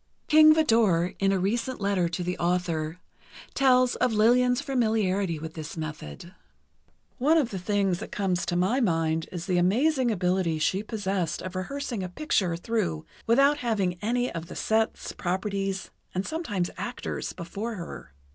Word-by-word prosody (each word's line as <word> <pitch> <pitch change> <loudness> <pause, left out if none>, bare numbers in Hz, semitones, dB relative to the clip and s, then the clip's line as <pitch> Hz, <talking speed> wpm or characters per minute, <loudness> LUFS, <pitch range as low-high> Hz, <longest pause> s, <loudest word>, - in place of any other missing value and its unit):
King 310 0 +7
Vidor, 220 - +3
in 195 0 +3
a 195 - +2
recent 230 +7 -1
letter 195 -4 +1
to 175 +1 -3
the 180 +1 -2
author, 170 -2 -1 0.6
tells 255 -2 +4
of 250 -2 +1
Lillian's 245 +3 +4
familiarity 210 - 0
with 160 +1 -7
this 160 0 -7
method: 155 - -7 0.9
One 300 +6 +4
of 275 -7 +1
the 190 - -4
things 195 -1 0
that - - -7
comes 185 -3 0
to 175 - -1
my 190 +9 +2
mind 165 -5 0
is 175 -2 -5
the 180 -2 +1
amazing 255 - +2
ability 180 -4 +1
she 185 +5 +1
possessed 200 -6 -2
of 185 +1 -6
rehearsing 240 +3 -3
a 185 - -4
picture 185 - 0
through 175 -6 -2 0.2
without 275 +5 +4
having 200 -8 -1
any 245 +3 0
of 165 0 -5
the - - -9
sets, 220 0 0
properties, 195 +1 -2 0.2
and 185 +2 -1
sometimes 210 - -2
actors, - - -4
before 200 +6 -5
her. 170 - -8
195 Hz, 155 wpm, -27 LUFS, 175-235 Hz, 0.9 s, King